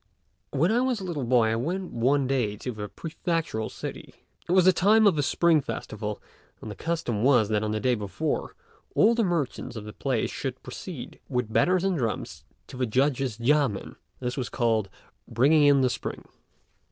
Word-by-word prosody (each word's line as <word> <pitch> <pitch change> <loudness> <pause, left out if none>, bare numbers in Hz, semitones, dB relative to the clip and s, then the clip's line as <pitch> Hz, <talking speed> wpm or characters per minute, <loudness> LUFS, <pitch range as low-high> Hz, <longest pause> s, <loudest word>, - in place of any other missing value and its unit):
When 160 +8 +1
I 235 - +3
was 255 -3 0
a - - -7
little 160 -8 -3
boy 120 -2 +3
I 110 - +1
went 175 +10 -3
one 135 +4 +2
day 125 -6 0
to 125 - -4
the 105 -2 -6
prefectural 165 -8 -3
city. - - -8 0.3
It - - 0
was 185 -1 +5
the 185 - +7
time 215 +5 +4
of 200 -5 +5
the 150 - +1
Spring 160 +2 +3
festival, 110 -3 -5 0.4
and 110 - -7
the - - -7
custom 160 -10 -2
was 120 -4 +4
that 105 -1 +1
on 110 - -1
the 110 0 -1
day 125 +2 +2
before, 105 -4 -3 0.4
all 225 +3 +5
the 230 -1 +1
merchants 170 - -2
of 110 - -6
the 105 - -8
place 130 -5 -1
should - - -5
proceed - - -8
with 125 -3 -2
banners 185 0 +3
and 190 -4 +1
drums 115 -3 -3 0.2
to - - -11
the 125 -1 0
judge's 130 -1 +1
yamên: 130 -3 +1 0.2
this 125 0 -3
was 125 -3 -2
called 110 -5 0 0.4
"bringing 145 +6 +4
in 140 -1 +5
the 130 - +4
Spring." - - -5
130 Hz, 190 wpm, -26 LUFS, 115-165 Hz, 0.4 s, the